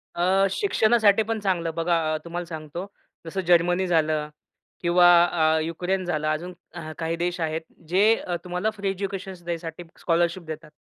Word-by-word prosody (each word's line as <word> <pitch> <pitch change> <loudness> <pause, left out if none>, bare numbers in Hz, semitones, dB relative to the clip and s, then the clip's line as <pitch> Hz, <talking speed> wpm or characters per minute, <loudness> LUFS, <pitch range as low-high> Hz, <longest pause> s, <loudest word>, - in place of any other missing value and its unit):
अ, 190 +3 +3
शिक्षणासाठी 220 - +3
पण 225 0 -2
चांगलं 175 -5 -1
बघा 170 0 +1 0.2
अ, - - 0
तुम्हाला 175 +1 -4
सांगतो. 160 +3 -6 0.4
जसं 190 +4 -3
जर्मनी 175 +2 +3
झालं 155 -3 +1 0.5
किंवा 175 0 +4 0.2
अ, 160 -2 +2
युक्रेन 180 +3 -2
झालं 155 -3 -1
अजून 170 +4 -2 0.4
काही 165 0 -2
देश 175 +1 -2
आहेत 160 0 -1 0.3
जे 205 +6 +3 0.2
तुम्हाला 180 +4 -1
फ्री 200 -1 -2
एज्युकेशन 195 0 -4
द्यायसाठी 170 0 -5 0.2
स्कॉलरशिप 170 +1 +1
देतात. 155 -1 -7
175 Hz, 145 wpm, -25 LUFS, 165-190 Hz, 0.5 s, किंवा